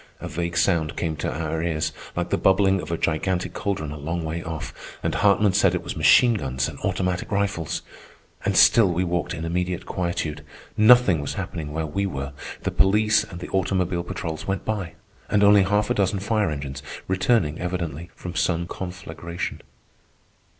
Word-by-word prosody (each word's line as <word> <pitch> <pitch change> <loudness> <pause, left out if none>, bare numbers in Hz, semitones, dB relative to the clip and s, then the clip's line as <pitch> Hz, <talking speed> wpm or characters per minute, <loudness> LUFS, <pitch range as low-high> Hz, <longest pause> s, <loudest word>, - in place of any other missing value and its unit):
A - - -6
vague 85 +1 -3
sound 85 -2 +1
came 80 -3 -1
to - - -2
our 80 0 -2
ears, 80 -2 -1 0.2
like - - -2
the - - +2
bubbling 95 0 +3
of 80 - -8
a 85 - -1
gigantic 90 +3 -1
caldron 85 -8 -2
a 75 - -7
long 80 +4 -3
way 80 +1 -3
off, 80 -2 -6 0.3
and - - 0
Hartman 100 -1 +3
said 95 -2 +3
it 90 - -3
was - - -5
machine 120 -2 +6
guns 65 - -1
and - - -8
automatic 90 -1 -1
rifles. 100 -6 -1 0.6
And - - +1
still 115 -5 +7
we 90 +2 0
walked 90 0 -1
in 80 -1 -5
immediate 90 +1 -2
quietude. 80 -4 -3 0.3
Nothing 110 -7 +6
was 70 - -4
happening 75 -2 -5
where 80 +1 -2
we 100 +6 -1
were. 70 -5 -5 0.3
The - - -1
police 105 +3 +3
and 90 0 -9
the - - -6
automobile 95 -2 0
patrols 80 -2 -5
went 95 -1 -2
by, 100 -6 -3 0.3
and 105 -1 +3
once 100 -2 +6
half 105 +1 +2
a - - +4
dozen 100 0 +1
fire 105 -1 +1
engines, 70 -2 -5 0.3
returning 95 -4 +1
evidently 85 -3 -4
from 90 - -7
some 85 +1 0
conflagration. 85 -2 -6
90 Hz, 180 wpm, -24 LUFS, 80-95 Hz, 0.6 s, still